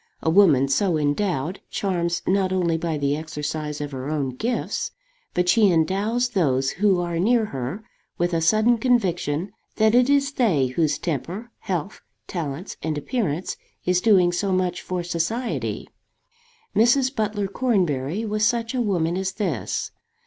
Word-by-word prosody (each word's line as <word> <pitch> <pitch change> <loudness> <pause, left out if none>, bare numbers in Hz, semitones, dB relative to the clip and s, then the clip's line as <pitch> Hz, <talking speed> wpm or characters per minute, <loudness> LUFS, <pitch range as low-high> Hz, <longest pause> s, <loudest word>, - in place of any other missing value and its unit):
A 160 - +2
woman 160 -8 +5
so 165 +5 +2
endowed 155 +2 -1
charms 170 -3 -1
not 190 0 +1
only 175 -3 +1
by 165 -1 -2
the 140 0 0
exercise 150 -1 -4
of 145 -1 -4
her 130 +1 -5
own 145 -3 -1
gifts, 245 - -2 0.5
but 180 0 +1
she 205 +2 +5
endows 200 +9 +1
those 135 - +1
who 195 -1 +2
are 170 -1 -2
near 225 +4 +3
her 135 - -5 0.3
with 175 0 0
a 165 - +1
sudden 215 +8 +3
conviction 190 - 0 0.2
that 220 0 +3
it 250 +2 +4
is 280 0 +3
they 200 - +2
whose 145 +3 0
temper, 180 - -4
health, 185 +1 -4 0.2
talents, 165 0 -5
and 155 -1 -2
appearance 180 - -2 0.3
is 180 0 +2
doing 185 -5 +5
so 195 +3 -1
much 185 -1 0
for 180 -1 -3
society. 175 +9 -2 0.9
Mrs. 255 +4 +3
Butler 210 -2 -1
Cornbury 190 - 0
was 215 0 -1
such 230 +2 +1
a 255 - 0
woman 175 -6 0
as 190 0 -2
this. 205 0 -2
180 Hz, 150 wpm, -23 LUFS, 155-215 Hz, 0.9 s, woman